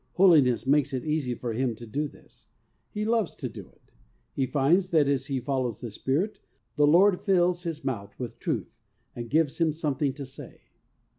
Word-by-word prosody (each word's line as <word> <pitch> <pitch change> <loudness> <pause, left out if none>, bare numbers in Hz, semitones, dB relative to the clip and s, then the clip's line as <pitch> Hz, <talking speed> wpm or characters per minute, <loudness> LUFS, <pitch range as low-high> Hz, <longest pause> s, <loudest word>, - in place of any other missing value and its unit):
Holiness 145 -11 +5
makes 140 0 +2
it 130 - -3
easy 150 -5 -1
for 120 -1 -4
him 120 0 -1
to 120 - -10
do 145 +7 -2
this. - - -19 0.4
He 210 -1 -3
loves 225 -4 0
to - - -4
do - - -10
it. - - -30 0.4
He 135 -2 0
finds 150 +8 +2
that, 155 -5 +3
as 140 -1 0
he 135 -3 -1
follows 125 -4 -2
the 120 - -6
Spirit, 150 - -1 0.4
the 150 -1 +4
Lord 180 +5 +5
fills 180 -2 +2
his 165 -3 -5
mouth 100 -6 -4
with 120 -3 -6
truth, - - -3 0.4
and 120 -1 -6
gives 155 -1 +1
him 165 -2 +3
some 150 -1 -2
thing 140 0 0
to 140 0 -7
say. 130 - -12
145 Hz, 195 wpm, -27 LUFS, 130-165 Hz, 0.4 s, Holiness